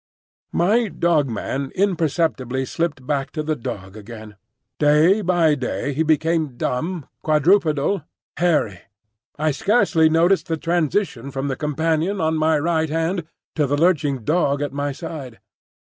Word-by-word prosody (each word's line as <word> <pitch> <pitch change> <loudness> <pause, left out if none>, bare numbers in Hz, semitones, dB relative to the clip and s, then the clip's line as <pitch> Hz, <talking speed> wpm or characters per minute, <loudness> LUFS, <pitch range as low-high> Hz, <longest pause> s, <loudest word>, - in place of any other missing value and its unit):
My 220 +6 +3
Dog 165 -5 +1
man 135 +4 -3
imperceptibly 160 -8 0
slipped 150 -2 -3
back 140 -1 -1
to 155 - -3
the 155 0 -1
dog 110 -7 -7
again; 110 0 -10 0.4
day 155 +7 +4
by 175 -4 +3
day 140 +1 -2
he 150 - -1
became 160 -3 +1
dumb, 160 +6 -2 0.2
quadrupedal, 155 +2 +2 0.4
hairy. 150 - +1 0.6
I 155 +1 +1
scarcely 175 - +3
noticed 170 +4 +3
the 160 - -1
transition 165 - -1
from 135 +1 -3
the 135 - -1
companion 160 +6 -1
on 160 -1 +1
my 155 0 +2
right 160 +1 0
hand 165 +2 -1 0.3
to 150 -3 +1
the 145 +2 0
lurching 145 -6 +1
dog 145 0 +1
at 145 - -4
my 145 0 -2
side. 140 -5 -8
155 Hz, 140 wpm, -21 LUFS, 140-170 Hz, 0.6 s, day